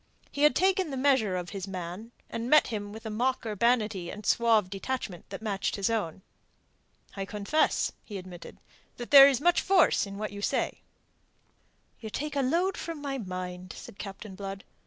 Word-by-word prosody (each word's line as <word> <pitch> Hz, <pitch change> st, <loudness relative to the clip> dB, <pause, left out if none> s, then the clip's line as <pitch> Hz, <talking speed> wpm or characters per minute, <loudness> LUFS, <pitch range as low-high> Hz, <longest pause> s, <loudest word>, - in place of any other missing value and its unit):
He 285 Hz, -, -4 dB
had 300 Hz, 0 st, +5 dB
taken 380 Hz, -1 st, +2 dB
the 270 Hz, -, -4 dB
measure 260 Hz, -8 st, +2 dB
of 175 Hz, -1 st, -5 dB
his 195 Hz, -1 st, -5 dB
man, 185 Hz, +4 st, -6 dB, 0.2 s
and 230 Hz, +1 st, -4 dB
met 305 Hz, +1 st, +6 dB
him 205 Hz, -3 st, -4 dB
with 220 Hz, +2 st, -10 dB
a 220 Hz, -, -4 dB
mock 250 Hz, +3 st, 0 dB
urbanity 215 Hz, -4 st, +1 dB
and 210 Hz, -, -8 dB
a -, -, -6 dB
suave 225 Hz, -4 st, +3 dB
detachment 195 Hz, -1 st, -5 dB
that 195 Hz, +2 st, -7 dB
matched 200 Hz, -3 st, -1 dB
his 200 Hz, +2 st, 0 dB
own. 190 Hz, -5 st, -2 dB, 0.9 s
"I 195 Hz, -, -3 dB
confess," 210 Hz, +10 st, 0 dB
he 205 Hz, -, -7 dB
admitted, 180 Hz, -2 st, -10 dB, 0.4 s
"that 240 Hz, -, -7 dB
there 275 Hz, -1 st, +11 dB
is 270 Hz, -, 0 dB
much 350 Hz, +4 st, +3 dB
force 370 Hz, -, +3 dB
in 200 Hz, 0 st, -8 dB
what 215 Hz, +1 st, -4 dB
you 205 Hz, 0 st, -7 dB
say." -, -, -1 dB, 1.2 s
"You 220 Hz, -, -7 dB
take 295 Hz, +6 st, -4 dB
a 280 Hz, -, +2 dB
load 345 Hz, +8 st, +1 dB
from 330 Hz, -2 st, -5 dB
my 275 Hz, -2 st, -4 dB
mind," 185 Hz, -2 st, -6 dB
said -, -, -11 dB
Captain 195 Hz, 0 st, -8 dB
Blood. 195 Hz, +1 st, -7 dB
215 Hz, 185 wpm, -28 LUFS, 195-270 Hz, 1.2 s, there